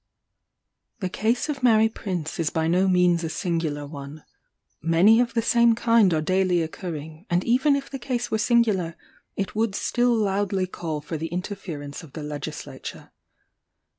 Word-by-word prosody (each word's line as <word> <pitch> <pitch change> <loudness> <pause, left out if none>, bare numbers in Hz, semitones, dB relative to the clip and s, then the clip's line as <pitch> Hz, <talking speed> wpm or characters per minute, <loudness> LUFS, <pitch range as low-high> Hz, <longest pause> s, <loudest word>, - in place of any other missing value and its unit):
The 185 - -2
case 225 - 0
of 290 -3 -3
Mary 225 -3 +5
Prince 180 -8 -4
is 160 -3 +1
by 160 0 -1
no 180 +3 +3
means 180 -2 +3
a 165 - -2
singular 160 -4 -2
one; 145 +1 -9 0.6
many 170 +8 +5
of 245 -1 0
the 230 - +2
same 235 0 +4
kind 230 -4 +4
are 155 -2 +1
daily 185 0 +2
occurring: 160 +1 -7
and 175 +1 +1
even 265 +4 +3
if 275 -1 -3
the 270 - -5
case 240 -1 -3
were 220 - +1
singular, 215 -7 +2 0.4
it 195 -1 -3
would 220 -2 0
still 245 +2 +1
loudly 200 -2 0
call 160 -4 -5
for 155 +2 -5
the 160 +2 -3
interference 175 -5 -6
of 160 -5 -14
the 155 - -6
legislature. 150 -1 -7
185 Hz, 165 wpm, -24 LUFS, 160-225 Hz, 0.6 s, Mary